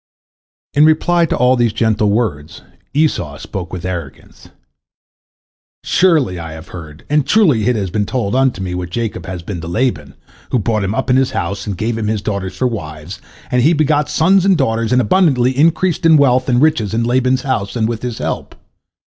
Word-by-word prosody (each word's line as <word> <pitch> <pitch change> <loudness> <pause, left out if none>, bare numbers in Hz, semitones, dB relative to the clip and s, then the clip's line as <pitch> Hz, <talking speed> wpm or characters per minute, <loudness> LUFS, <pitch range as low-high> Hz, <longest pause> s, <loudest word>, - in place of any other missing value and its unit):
" - - -87
In 145 - +4
reply 165 +2 +3
to - - -1
all 125 +1 +3
these 120 -3 +1
gentle 110 -2 +1
words, 95 -9 -2 0.3
Esau 115 - 0
spoke 90 +3 -7
with 90 -1 -6
arrogance: 85 -6 -7 1.3
"Surely 155 - +2
I 80 -1 -7
have 80 +2 -11
heard, 80 -4 -11
and 150 0 +2
truly 145 - +3
it 125 - +2
has 95 -4 -3
been 105 0 -1
told 120 -4 -2
unto 130 -7 +1
me 90 -1 -4
what 90 0 -4
Jacob 110 +2 -4
has 90 -2 -6
been 90 -1 -6
to 85 - -7
Laban, 85 - -2 0.3
who - - +1
brought 110 -2 -1
him 100 +3 -2
up 125 - -1
in 125 - +4
his 135 -1 +2
house, 100 +4 -3
and 100 -3 -3
gave 115 +3 -2
him 105 - -2
his 105 -1 -2
daughters 100 -3 -4
for 130 - 0
wives, 80 -7 -5 0.3
and 125 - +2
he 155 +7 +4
begot 150 -2 +1
sons 185 +4 +3
and 195 -2 +3
daughters, 115 -5 0
and 125 0 +4
abundantly 130 - +2
increased 165 +4 +1
in 165 -1 +6
wealth 130 -2 +2
and 125 +2 +3
riches 115 -10 +1
in 115 - 0
Laban's 130 +2 +1
house 125 -8 -2
and 110 -2 0
with 115 -1 -4
his 120 -2 -4
help. - - -4
115 Hz, 200 wpm, -16 LUFS, 95-135 Hz, 1.3 s, in